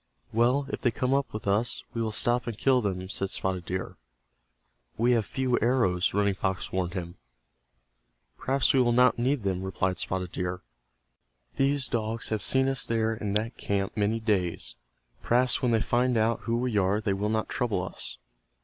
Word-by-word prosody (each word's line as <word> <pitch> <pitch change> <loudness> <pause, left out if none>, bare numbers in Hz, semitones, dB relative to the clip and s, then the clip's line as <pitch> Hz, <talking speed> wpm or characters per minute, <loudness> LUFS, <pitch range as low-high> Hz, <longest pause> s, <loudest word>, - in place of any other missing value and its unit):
"Well, 125 +5 +3
if - - -4
they 125 - +3
come 125 +3 -1
up 140 -1 0
with 110 - -6
us, 105 +5 +1
we 115 - -2
will 110 -1 -1
stop 120 +2 +1
and 115 -3 -4
kill 130 0 +3
them," 95 -3 -2
said 95 0 -2
Spotted 95 -2 -3
Deer. 90 0 -4 1.0
"We 120 +2 +3
have 115 -5 +2
few 130 -2 0
arrows," 105 -7 +2
Running 100 0 +2
Fox 95 0 -2
warned 90 0 -2
him. 85 -2 -5 1.2
"Perhaps 135 0 +1
we 135 - +5
will 120 -1 +3
not 125 0 +4
need 130 0 +1
them," 95 -2 -1
replied 95 -1 -1
Spotted 90 -1 -2
Deer. 90 0 -3 0.9
"These 135 0 +2
dogs 115 0 -2
have 110 -1 -1
seen 130 0 +2
us 135 -1 +1
there 115 -1 +1
in 105 -2 -3
that 110 +3 -1
camp 100 -1 -2
many 105 +2 +1
days. 100 -6 -1 0.5
Perhaps 125 +1 +2
when 125 - +2
they 110 -1 +3
find 125 +1 +1
out 110 +1 +2
who 115 0 0
we 120 -3 0
are 100 +2 +2
they 105 -2 0
will 100 +2 -1
not 110 0 0
trouble 110 -7 -1
us." 95 - -6
110 Hz, 185 wpm, -28 LUFS, 95-125 Hz, 1.2 s, we